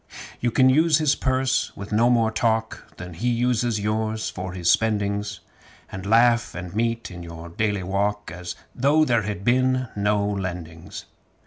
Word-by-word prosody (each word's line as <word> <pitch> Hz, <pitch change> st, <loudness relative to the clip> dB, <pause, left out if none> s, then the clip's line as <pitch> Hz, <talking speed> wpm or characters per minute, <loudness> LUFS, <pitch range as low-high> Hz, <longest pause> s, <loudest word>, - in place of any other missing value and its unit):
You 120 Hz, -, +1 dB
can 130 Hz, +2 st, +4 dB
use 155 Hz, +4 st, +4 dB
his 155 Hz, -3 st, +2 dB
purse 130 Hz, 0 st, 0 dB
with 100 Hz, +2 st, -8 dB
no 115 Hz, +3 st, +3 dB
more 115 Hz, -2 st, +2 dB
shame 110 Hz, -1 st, +2 dB, 0.3 s
Than 90 Hz, 0 st, -8 dB
he 115 Hz, +10 st, -1 dB
uses 120 Hz, -2 st, +1 dB
yours 110 Hz, +1 st, -2 dB
for 95 Hz, -1 st, -6 dB
his 90 Hz, -2 st, -4 dB
spendings; 105 Hz, -2 st, +1 dB, 0.5 s
And 95 Hz, +1 st, -6 dB
laugh 115 Hz, +2 st, +3 dB
and 90 Hz, +1 st, -7 dB
mention 115 Hz, -6 st, -2 dB
it -, -, -10 dB
just 85 Hz, +1 st, -10 dB
the 100 Hz, -1 st, 0 dB, 0.2 s
same 90 Hz, -, -9 dB
As 90 Hz, 0 st, -6 dB, 0.2 s
though 145 Hz, +5 st, +3 dB
there 120 Hz, -5 st, +2 dB
had 105 Hz, -1 st, -5 dB
been 130 Hz, 0 st, +2 dB
no 105 Hz, 0 st, +1 dB
lendings. 90 Hz, -5 st, -5 dB
110 Hz, 160 wpm, -24 LUFS, 95-120 Hz, 0.5 s, can